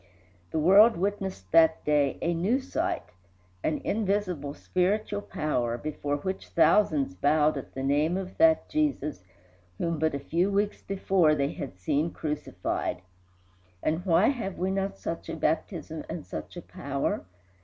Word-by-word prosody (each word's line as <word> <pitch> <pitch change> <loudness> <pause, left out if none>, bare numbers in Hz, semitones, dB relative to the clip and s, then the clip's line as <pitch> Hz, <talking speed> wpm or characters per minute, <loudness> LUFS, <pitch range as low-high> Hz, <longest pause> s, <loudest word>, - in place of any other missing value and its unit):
The - - -3
world 195 +8 +6
witnessed 190 - -3
that 160 -1 +5
day 145 -2 +2
a 170 - +1
new 195 +10 +1
sight 330 +6 -2 0.6
an 155 - +1
invisible 195 -8 -1
spiritual 205 +3 0
power, 125 -10 -1
before 145 +1 -3
which 190 +6 -4
thousands 155 - +3
bowed 150 +9 +3
at 135 - -7
the 135 - -3
name 150 +6 +2
of 190 -1 -6
that 320 -1 +5
Jesus 275 - -1 0.5
whom 165 -2 -1
but 160 -1 +1
a - - -2
few 170 +7 0
weeks 205 +1 0
before 190 -5 +2
they 140 -1 0
had 130 -10 -7
seen 145 - 0
crucified. 150 - -3 0.8
And 160 +3 0
why 180 +2 +4
have 225 -9 -3
we 185 +1 0
not 195 0 -2
such 165 - -5
a - - -3
baptism 160 0 -2
and 165 - -5
such - - -7
a 175 - -7
power? 140 - -3
165 Hz, 150 wpm, -28 LUFS, 150-195 Hz, 0.8 s, world